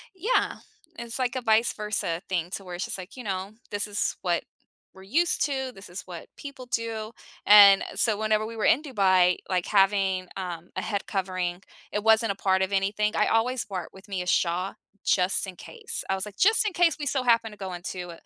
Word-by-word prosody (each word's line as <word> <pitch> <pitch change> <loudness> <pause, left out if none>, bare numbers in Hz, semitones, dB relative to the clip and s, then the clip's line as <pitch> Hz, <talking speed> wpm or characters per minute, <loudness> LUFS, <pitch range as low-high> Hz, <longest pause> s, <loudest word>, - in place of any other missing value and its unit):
Yeah, 425 +8 0 0.4
it's 235 +1 -5
like 255 0 0
a 255 - -1
vice 225 0 +3
versa 210 -6 -2
thing 175 -2 -1
to 195 - -5
where 180 -2 -7
it's 175 - -3
just - - -4
like, 185 +7 -10
you 250 - -7
know, 190 -1 -3 0.2
this 205 +1 -2
is 205 0 -1
what 175 -2 0 0.5
we're 190 - -14
used 330 - +1
to, 265 -3 -2
this 195 +1 -13
is 175 +2 -7
what 175 -3 -9
people 275 -3 -9
do, 225 -2 -3 0.4
and 200 -1 +9
so, 215 -3 +1
whenever 215 0 +1
we 230 +1 -7
were 220 - -1
in 295 - +4
Dubai, 185 - +3
like, 180 -2 0
having, 195 -2 +2
um, 175 -2 -6
a - - -3
head 200 -2 -3
covering, 185 -2 -2 0.3
it 210 - -2
wasn't 225 -1 +4
a - - -4
part 190 -1 +1
of 190 - 0
anything, 205 +2 0
I - - +3
always 240 +2 +1
brought 190 -3 -6
with 190 +2 -15
me 195 -2 -3
a 180 - -6
shaw 180 +2 +1 0.3
just 185 +1 +1
in 185 - -8
case. 165 - -7
I 195 - +2
was 190 - -2
like, 210 -2 -11
"Just 440 +2 +4
in 425 - 0
case 340 -3 +3
we 290 - -3
so 265 -1 0
happen 230 -2 +3
to 210 - -13
go 190 -2 -6
into 175 0 -6
200 Hz, 215 wpm, -26 LUFS, 185-230 Hz, 0.5 s, and